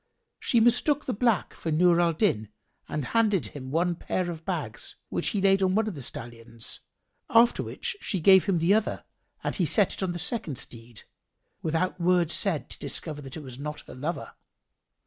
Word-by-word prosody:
She 235 Hz, -, +3 dB
mistook 245 Hz, +5 st, +3 dB
the 255 Hz, -, -1 dB
black 225 Hz, -2 st, +1 dB
for 165 Hz, -, -5 dB
Nur 175 Hz, +2 st, +4 dB
al 170 Hz, -1 st, +3 dB
Din 155 Hz, -, +1 dB, 0.4 s
and 150 Hz, -3 st, -2 dB
handed 210 Hz, -, +2 dB
him 130 Hz, +4 st, -8 dB
one 170 Hz, +5 st, +1 dB
pair 175 Hz, +1 st, -2 dB
of 165 Hz, -1 st, -8 dB
bags, -, -, -3 dB
which -, -, -1 dB
he 205 Hz, -, 0 dB
laid 195 Hz, 0 st, +4 dB
on 190 Hz, 0 st, +2 dB
one 220 Hz, +1 st, +2 dB
of 215 Hz, -, -2 dB
the 145 Hz, -, -8 dB
stallions: 115 Hz, -1 st, -6 dB, 0.5 s
after 235 Hz, +1 st, +5 dB
which 480 Hz, 0 st, -3 dB
she 195 Hz, -, -1 dB
gave 190 Hz, +2 st, +7 dB
him 195 Hz, -4 st, +2 dB
the 170 Hz, +4 st, +3 dB
other 215 Hz, 0 st, 0 dB, 0.4 s
and -, -, -2 dB
he 180 Hz, -, +1 dB
set 190 Hz, +6 st, +4 dB
it -, -, -6 dB
on 190 Hz, -2 st, 0 dB
the 175 Hz, -, -4 dB
second 175 Hz, -, -1 dB
steed, 115 Hz, -3 st, -6 dB, 0.6 s
without 165 Hz, +3 st, -1 dB
word 175 Hz, -2 st, +3 dB
said 180 Hz, -7 st, 0 dB
to -, -, -7 dB
discover 145 Hz, +1 st, -2 dB
that 135 Hz, +2 st, -8 dB
it 155 Hz, -, -8 dB
was 130 Hz, -1 st, -9 dB
not 150 Hz, +1 st, -5 dB
her -, -, -12 dB
lover. 150 Hz, +6 st, -4 dB
175 Hz, 195 wpm, -27 LUFS, 145-200 Hz, 0.6 s, gave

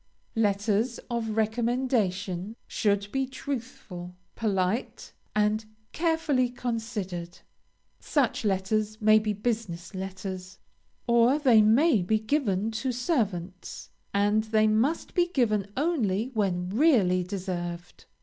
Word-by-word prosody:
LETTERS 215 Hz, +2 st, +1 dB
OF 225 Hz, -2 st, -2 dB
RECOMMENDATION 220 Hz, -4 st, 0 dB
should 205 Hz, -2 st, 0 dB
be 270 Hz, -1 st, 0 dB
truthful, 230 Hz, -10 st, -6 dB, 0.2 s
polite, 200 Hz, +1 st, -1 dB, 0.2 s
and 210 Hz, +1 st, +2 dB, 0.3 s
carefully 320 Hz, -6 st, +1 dB
considered. 220 Hz, -8 st, -4 dB, 0.6 s
Such 280 Hz, -7 st, 0 dB
letters 210 Hz, +2 st, 0 dB
may 215 Hz, 0 st, +6 dB
be 215 Hz, -1 st, -1 dB
business 210 Hz, -5 st, -3 dB
letters, 190 Hz, 0 st, -6 dB, 0.5 s
or 235 Hz, +3 st, +4 dB
they 250 Hz, -7 st, +5 dB
may 225 Hz, -, +4 dB
be 215 Hz, +5 st, +2 dB
given 220 Hz, -3 st, 0 dB
to 260 Hz, -, 0 dB
servants, 205 Hz, -, -2 dB, 0.2 s
and 205 Hz, +2 st, +2 dB
they 215 Hz, 0 st, +3 dB
must 225 Hz, +10 st, +1 dB
be 350 Hz, -1 st, +3 dB
given 215 Hz, -, 0 dB
only 255 Hz, -, 0 dB
when 180 Hz, -5 st, 0 dB
really 210 Hz, -, +3 dB
deserved. 175 Hz, -2 st, -5 dB
215 Hz, 105 wpm, -27 LUFS, 190-245 Hz, 0.6 s, may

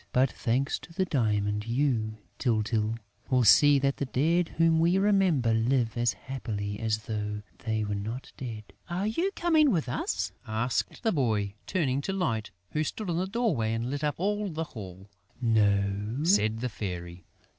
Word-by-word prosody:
"But, 130 Hz, 0 st, +3 dB
thanks 130 Hz, +3 st, 0 dB
to -, -, -14 dB
the 185 Hz, +3 st, 0 dB
diamond, 105 Hz, -, 0 dB
you, 115 Hz, -4 st, 0 dB, 0.2 s
Tyltyl, 110 Hz, -2 st, 0 dB, 0.3 s
will 125 Hz, -2 st, +3 dB
see 145 Hz, +6 st, +7 dB
that 140 Hz, 0 st, +1 dB
the 140 Hz, -, -2 dB
dead 165 Hz, +7 st, +2 dB
whom 165 Hz, 0 st, +4 dB
we 170 Hz, +3 st, +3 dB
remember 190 Hz, -, +3 dB
live 115 Hz, +1 st, +1 dB
as 120 Hz, 0 st, +2 dB
happily 105 Hz, -7 st, -5 dB
as 110 Hz, -2 st, -1 dB
though 105 Hz, -1 st, -3 dB, 0.2 s
they 110 Hz, -1 st, -1 dB
were 105 Hz, 0 st, -2 dB
not 110 Hz, +6 st, -5 dB
dead." 115 Hz, -4 st, -6 dB, 0.3 s
"Are 180 Hz, +3 st, -1 dB
you 330 Hz, -, 0 dB
coming 320 Hz, -4 st, +4 dB
with 165 Hz, -, +1 dB
us?" 95 Hz, -5 st, -2 dB, 0.2 s
asked 110 Hz, -, -1 dB
the 225 Hz, -, +3 dB
boy, 110 Hz, -, 0 dB
turning 140 Hz, -7 st, 0 dB
to 195 Hz, -, -3 dB
Light, 115 Hz, -, -1 dB, 0.2 s
who 155 Hz, -, 0 dB
stood 190 Hz, +4 st, -3 dB
in 165 Hz, -, -1 dB
the 185 Hz, +2 st, 0 dB
doorway 185 Hz, -, 0 dB
and 115 Hz, +3 st, -2 dB
lit 145 Hz, +1 st, -3 dB
up 150 Hz, -1 st, 0 dB
all 205 Hz, +2 st, 0 dB
the 160 Hz, -1 st, -3 dB
hall. 95 Hz, -3 st, -9 dB, 0.3 s
"No," 105 Hz, +1 st, +1 dB
said 115 Hz, -, +3 dB
the 125 Hz, -, -1 dB
Fairy. 90 Hz, -4 st, -6 dB
125 Hz, 170 wpm, -28 LUFS, 110-160 Hz, 0.3 s, see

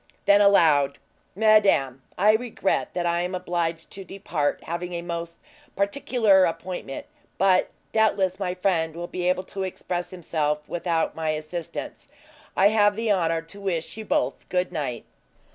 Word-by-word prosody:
Then 200 Hz, 0 st, +6 dB
aloud: 155 Hz, -8 st, +4 dB, 0.4 s
"Madame, 200 Hz, -, +4 dB, 0.2 s
I 205 Hz, +3 st, +5 dB
regret 220 Hz, -4 st, -1 dB
that 175 Hz, -1 st, -1 dB
I 170 Hz, 0 st, +1 dB
am 180 Hz, +1 st, -2 dB
obliged 170 Hz, -2 st, -2 dB
to 195 Hz, -, -7 dB
depart, 175 Hz, -6 st, -2 dB
having 175 Hz, +1 st, -4 dB
a 170 Hz, 0 st, -4 dB
most 170 Hz, -1 st, -5 dB, 0.4 s
particular 200 Hz, -2 st, +3 dB
appointment; 175 Hz, -4 st, -5 dB, 0.3 s
but, 185 Hz, -1 st, +3 dB, 0.2 s
doubtless, 200 Hz, -4 st, +2 dB
my 180 Hz, -2 st, -2 dB
friend 165 Hz, -4 st, 0 dB
will 175 Hz, +1 st, -4 dB
be 180 Hz, 0 st, -2 dB
able 185 Hz, 0 st, 0 dB
to 195 Hz, +1 st, -7 dB
express 180 Hz, -1 st, -3 dB
himself 150 Hz, -4 st, -2 dB
without 170 Hz, -2 st, -1 dB
my 160 Hz, -1 st, -2 dB
assistance. 155 Hz, +2 st, -7 dB, 0.5 s
I 195 Hz, +2 st, +6 dB
have 205 Hz, -1 st, +3 dB
the 225 Hz, 0 st, 0 dB
honor 165 Hz, -4 st, +1 dB
to 200 Hz, +5 st, -12 dB
wish 175 Hz, -5 st, -2 dB
you 220 Hz, -, -6 dB
both -, -, -1 dB
good 180 Hz, 0 st, 0 dB
night." 140 Hz, -8 st, -4 dB
180 Hz, 150 wpm, -25 LUFS, 165-195 Hz, 0.5 s, Then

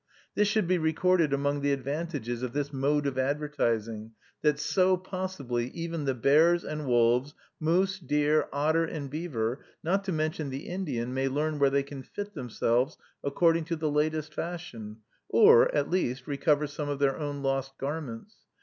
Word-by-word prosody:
This 210 Hz, -, +2 dB
should 210 Hz, -3 st, +1 dB
be 180 Hz, 0 st, +2 dB
recorded 160 Hz, 0 st, +2 dB
among 140 Hz, +1 st, 0 dB
the 145 Hz, 0 st, +1 dB
advantages 140 Hz, -3 st, -3 dB
of 125 Hz, -2 st, -3 dB
this 145 Hz, 0 st, -2 dB
mode 145 Hz, +2 st, +1 dB
of 135 Hz, -2 st, -1 dB
advertising, 115 Hz, -6 st, -1 dB, 0.3 s
that 150 Hz, -2 st, +3 dB
so, 185 Hz, +4 st, +2 dB
possibly, 180 Hz, -11 st, -3 dB
even 165 Hz, -2 st, -3 dB
the 135 Hz, -1 st, 0 dB
bears 160 Hz, +8 st, +4 dB
and 150 Hz, -2 st, -5 dB
wolves, 120 Hz, +4 st, +3 dB, 0.2 s
moose, 185 Hz, +5 st, +1 dB
deer, 150 Hz, -1 st, +1 dB
otter, 155 Hz, +4 st, +2 dB
and 150 Hz, -4 st, -5 dB
beaver, 135 Hz, -6 st, -2 dB, 0.2 s
not 195 Hz, +4 st, +1 dB
to 190 Hz, -, -1 dB
mention 155 Hz, -2 st, -1 dB
the 135 Hz, +2 st, -6 dB
Indian, 135 Hz, -10 st, -3 dB
may 135 Hz, +1 st, 0 dB
learn 150 Hz, +3 st, -1 dB
where 140 Hz, -1 st, +5 dB
they 140 Hz, 0 st, +1 dB
can 140 Hz, -1 st, -8 dB
fit 205 Hz, +9 st, -7 dB
themselves 120 Hz, -, 0 dB, 0.3 s
according 165 Hz, +3 st, +2 dB
to 165 Hz, +1 st, -2 dB
the 155 Hz, -2 st, -1 dB
latest 155 Hz, +1 st, 0 dB
fashion, 120 Hz, -13 st, -6 dB, 0.3 s
or, 470 Hz, +3 st, +7 dB
at -, -, 0 dB
least, 130 Hz, -8 st, 0 dB
recover 150 Hz, +1 st, +1 dB
some 145 Hz, 0 st, -5 dB
of 145 Hz, -, -1 dB
their 140 Hz, 0 st, +1 dB
own 145 Hz, -2 st, -4 dB
lost 135 Hz, 0 st, -1 dB
garments. 145 Hz, -, -5 dB
145 Hz, 170 wpm, -28 LUFS, 135-165 Hz, 0.3 s, or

